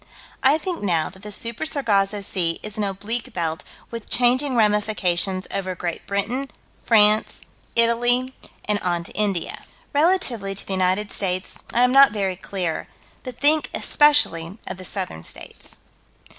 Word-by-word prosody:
I 275 +4 +5
think, 350 +2 -4
now, 170 -6 0
that 190 - -15
the 210 +1 -8
Super 230 +3 -4
Sargasso 210 -10 +1
Sea 175 -4 0
is 215 -1 -5
an 215 - -2
oblique 210 +6 -2
belt, 165 -1 -2 0.3
with 230 -2 -7
changing 255 +2 +2
ramifications, 205 -4 +1
over 185 -2 -3
Great 175 -1 -5
Britain, 230 +8 -2 0.2
France, 215 -1 +3 0.3
Italy, 240 +2 +2 0.3
and 210 -1 0
on 175 -2 -1
to - - -10
India. 200 -5 -2 0.3
Relatively 285 - +1
to - - -3
the 195 - -4
United 190 +2 0
States 185 -1 -2
I 240 - +3
am 250 - +4
not 275 -3 +7
very 195 -3 -1
clear, 180 -3 -4 0.3
but 250 -1 -9
think 300 +2 +3
especially 200 - +3
of - - -6
the 185 - -8
Southern 185 - -4
States. - - -7
210 Hz, 150 wpm, -22 LUFS, 185-245 Hz, 0.3 s, not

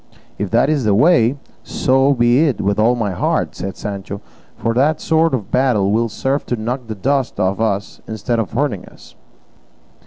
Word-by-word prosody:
"If 100 -1 -2
that's 135 +6 +2
the 105 -2 +2
way, 140 - +4 0.2
so 135 +2 +2
be 120 +6 +3
it 130 -8 -1
with 100 +1 0
all 115 +3 +4
my 110 -4 -1
heart," 90 - -1
said 95 +1 -6
Sancho, 100 -1 -5 0.4
"for 115 - -1
that 145 +6 +2
sort 160 -2 +2
of 110 -2 -6
battle 120 -7 +2
will 115 +2 +1
serve 135 +6 -1
to 120 - 0
knock 120 +2 -4
the 110 - -5
dust 135 +6 -1
out 95 0 +2
of 100 - -6
us 100 -2 -2
instead 110 +2 -2
of 110 - -3
hurting 120 -6 -1
us." - - -17
115 Hz, 185 wpm, -18 LUFS, 105-135 Hz, 0.4 s, way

